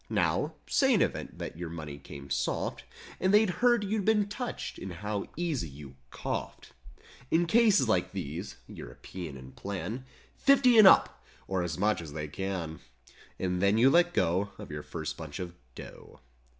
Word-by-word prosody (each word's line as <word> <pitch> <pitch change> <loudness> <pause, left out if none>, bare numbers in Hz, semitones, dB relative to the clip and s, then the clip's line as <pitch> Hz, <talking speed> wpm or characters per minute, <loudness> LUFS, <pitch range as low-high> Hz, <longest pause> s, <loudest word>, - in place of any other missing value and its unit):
Now, - - +1
say 270 -3 +3
in 200 - +3
event - - -4
that 80 - -6
your 85 -2 -4
money 75 -4 -7
came 70 0 -10
"soft" 70 - -1 0.4
154 - - -9
And 190 - +4
they'd 210 -2 +5
heard 240 -3 +4
you'd 205 +1 -1
been 210 0 +3
touched, 210 +4 -5
and 95 - -6
how 105 +3 -4
easy 160 - -1
you 70 -1 -11
"coughed"— - - -5 0.6
In 170 +2 +3
cases 210 - +4
like 95 -5 +1
these—European 85 -2 -7
in 65 0 -11
plan— 100 - -5 0.3
"Fifty 260 -4 +5
and 210 - +10
up" - - +5 0.2
or 95 -1 0
as 85 -2 -3
much 105 0 +1
as 75 -3 -9
they 75 0 -4
can. 85 -1 -4 0.6
And 90 -1 -1
then 100 +2 +4
you 130 +4 +6
let 175 +2 +5
go 95 +5 +1
Of - - -9
your 75 0 -4
first 80 +1 -5
bunch 80 -3 -7
of 90 -2 -5 0.2
"dough." - - -11
95 Hz, 170 wpm, -30 LUFS, -, 0.6 s, and